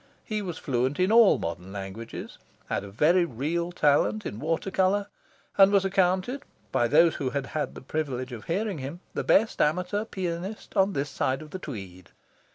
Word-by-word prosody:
He 215 -2 -2
was 175 -5 -5
fluent 130 +2 -1
in 185 +3 +3
all 230 -2 +7
modern 90 +3 -5
languages, 100 +3 -7 0.3
had - - -1
a 100 - -8
very 155 - +3
real 170 +5 -2
talent 175 +6 +2
in 105 - -5
water 165 +6 -1
colour, 190 +2 +2 0.5
and 195 0 +8
was 200 -1 +3
accounted, 190 +7 +1 0.3
by 120 - +2
those 160 +6 +4
who 135 - -1
had 140 +1 -2
had 150 +2 -3
the - - -8
privilege 130 -3 -3
of 115 -3 -8
hearing 195 0 -1
him, 140 +7 -6
the - - -2
best 220 +2 +3
amateur 180 +7 +1
pianist 190 0 -5
on 195 0 +3
this 140 -1 -2
side 130 +3 -1
of 150 - -13
the 185 - -5
Tweed. 95 - -8
165 Hz, 180 wpm, -27 LUFS, 130-190 Hz, 0.5 s, and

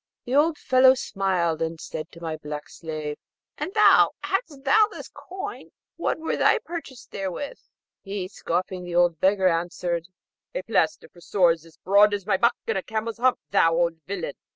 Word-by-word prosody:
The 245 - -4
old 300 +3 +3
fellow 260 -1 +5
smiled, 185 -8 -1
and 165 0 -2
said 155 0 -7
to 170 - -13
my 160 -2 -3
black 150 -1 -7
slave, 155 -2 -6 0.4
'And - - -3
thou, 420 -2 +6
hadst 340 - -2
thou 355 +11 +5
this - - -8
coin, 375 +1 -8 0.3
what 340 - -1
were 320 0 -2
thy - - +4
purchase 320 - -8
therewith?' 195 - -5 0.4
He, 195 -2 -4
scoffing 185 0 -3
the 175 -1 -6
old 175 -2 +3
beggar, 190 0 +3
answered, 170 0 -1 0.5
'A - - -2
plaister - - 0
for 175 - -19
sores 170 -4 +2
as 165 - -20
broad 205 +2 +4
as 200 -2 -7
my 200 -2 +2
back, 235 +4 +3
and - - 0
a - - -5
camel's 220 +3 -4
hump, 255 +1 +3
O - - -67
thou 165 -4 +4
old 170 -1 +1
villain!' 180 -7 -4
190 Hz, 180 wpm, -25 LUFS, 170-255 Hz, 0.5 s, thou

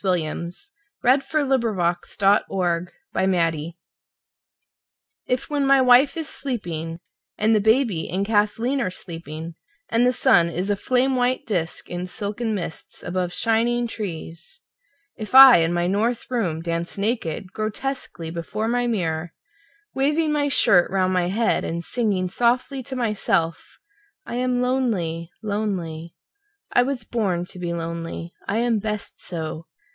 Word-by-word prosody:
William 170 -3 -1 0.6
Carlos 270 +2 +3
Williams 230 - 0
Danse 200 0 +4
Russe 175 - -1 1.5
IF 250 +1 -1
when 285 -2 +1
my 275 0 +6
wife 255 +4 +5
is 320 -2 -3
sleeping 170 - -4 0.4
and 220 +1 +3
the 215 - +4
baby 220 -5 +2
and 190 +3 -1
Kathleen 225 +5 +1
are 210 - 0
sleeping 165 -2 -8 0.4
and 230 +1 +2
the 250 - +4
sun 170 -8 +4
is 180 +4 -2
a - - +2
flame 255 +5 +1
white 250 +1 +1
disc 175 -7 -2
in 175 +1 -4
silken 215 +4 -3
mists 170 -4 -7
above 180 0 -2
shining 235 +3 +1
trees, 200 - -6 0.5
if 215 +3 -5
I 265 -1 +11
in 165 0 +2
my 175 0 0
north 220 +7 -1
room 175 -10 -1
dance 170 +1 -3
naked, 195 -4 -2
grotesquely 215 -6 -4
before 190 +6 -3
my 245 +1 +1
mirror 170 -6 -2 0.6
waving 300 +4 +1
my 295 -1 +1
shirt 180 -9 +4
round 185 -1 +1
my 180 -1 +1
head 220 +5 +1
and 170 +1 -3
singing 200 -4 0
softly 245 +6 0
to 260 +1 -7
myself: 200 -8 -1 0.5
"I - - -7
am 250 0 +1
lonely, 195 -11 -1
lonely. 185 -6 -3 0.6
I - - +6
was 250 -2 -2
born 195 -7 -1
to 180 - -11
be 175 -1 -3
lonely, 170 0 -5
I 200 - 0
am 235 -2 +2
best 210 0 -5
so!" 160 -1 -5
205 Hz, 140 wpm, -23 LUFS, 170-245 Hz, 1.5 s, I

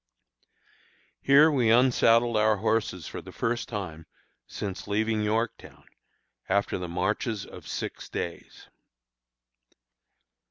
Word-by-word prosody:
Here 145 +3 +6
we 125 -6 +2
unsaddled 120 -1 +4
our 110 0 +3
horses 105 -5 -1
for - - -7
the - - -11
first 120 +1 -2
time 90 -7 -6 0.4
since 100 -1 -6
leaving 110 +1 0
Yorktown, 110 +2 -3 0.6
after 100 0 +1
the 90 -1 -5
marches 100 +4 -2
of - - -12
six - - -5
days. 85 - -6
110 Hz, 105 wpm, -27 LUFS, 100-115 Hz, 0.6 s, Here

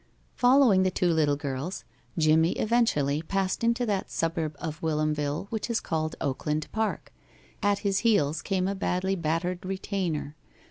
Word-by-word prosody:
Following 245 -6 +5
the 185 - +3
two 180 -1 +1
little 150 -3 +2
girls, 140 +4 -4 0.3
Jimmie 160 +1 +4
eventually 160 - +1
passed 190 +5 -1
into 235 +1 +2
that 200 -4 -1
suburb 165 -2 -2
of 155 -2 -5
Whilomville 150 -1 -1
which 220 +1 -3
is 235 - +1
called 155 -1 -2
Oakland 150 +3 -1
Park. 220 0 -2 0.5
At 205 -1 +2
his 195 -1 +2
heels 170 -10 +2
came 190 -2 0
a 200 - 0
badly 190 0 -1
battered 175 +2 -2
retainer. 185 -6 -3
175 Hz, 145 wpm, -27 LUFS, 155-200 Hz, 0.5 s, Following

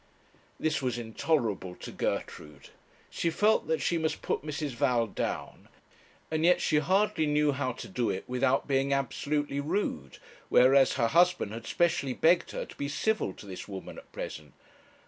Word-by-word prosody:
This 155 -3 0
was 125 -2 -1
intolerable 110 - -1
to - - -9
Gertrude. 75 -2 -4 0.4
She 170 - 0
felt 210 +6 +2
that 160 0 0
she 170 - +1
must 160 -1 -2
put - - -1
Mrs. 150 -1 -4
Val 120 -1 +1
down, 105 - -4 0.6
and 155 0 0
yet 180 +1 +5
she 150 - +2
hardly 185 0 +2
knew 150 0 +3
how 130 -2 -2
to - - -8
do 120 -2 -1
it 95 -1 -2
without 125 +2 +1
being 135 0 +1
absolutely 140 +1 -1
rude; 145 - -2 0.3
whereas 135 +1 +5
her 115 -3 +1
husband 175 - +3
had 115 0 -7
specially 160 -6 +1
begged 170 +6 +3
her - - -4
to - - -13
be 140 - -3
civil 215 - 0
to - - -13
this 95 -2 -8
woman 95 -2 -8
at - - -19
present. 75 -1 -7
140 Hz, 165 wpm, -29 LUFS, 120-160 Hz, 0.6 s, yet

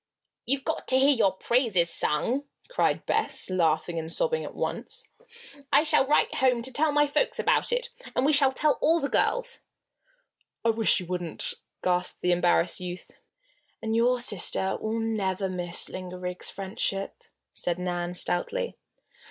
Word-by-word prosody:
"You've 270 +2 0
got - - -3
to 260 - +3
hear 275 +2 +5
your 200 -5 +3
praises 190 -5 +1
sung!" 240 - 0 0.3
cried - - +1
Bess, - - -1
laughing 165 -1 +1
and 160 0 -6
sobbing 480 - 0
at - - -8
once. - - -4 0.6
"I 285 +2 +5
shall 305 -4 +3
write 295 - +3
home 250 -3 +2
to 290 +5 0
my 295 0 +4
folks 295 +13 0
about - - +1
it. 485 0 0 0.3
And 255 - +2
we 305 - +3
shall 275 -2 +5
tell 295 +2 +1
all 330 +2 +4
the 280 - -2
girls." - - +1 1.1
"I 230 - +5
wish 225 -2 +3
you 180 - -6
wouldn't!" 175 -2 -1 0.3
gasped 180 0 0
the 180 - +2
embarrassed 175 0 +2
youth. 180 0 -7 0.7
"And 220 0 -2
your 245 +2 +3
sister 190 -4 +2
will 220 +1 -2
never 200 -4 -1
miss 175 -2 0
Linda 185 -1 -7
Riggs' 180 0 -4
friendship," 195 0 -3 0.3
said 175 -1 -2
Nan, 175 -1 -3
stoutly. 470 - -2
220 Hz, 155 wpm, -27 LUFS, 180-275 Hz, 1.1 s, hear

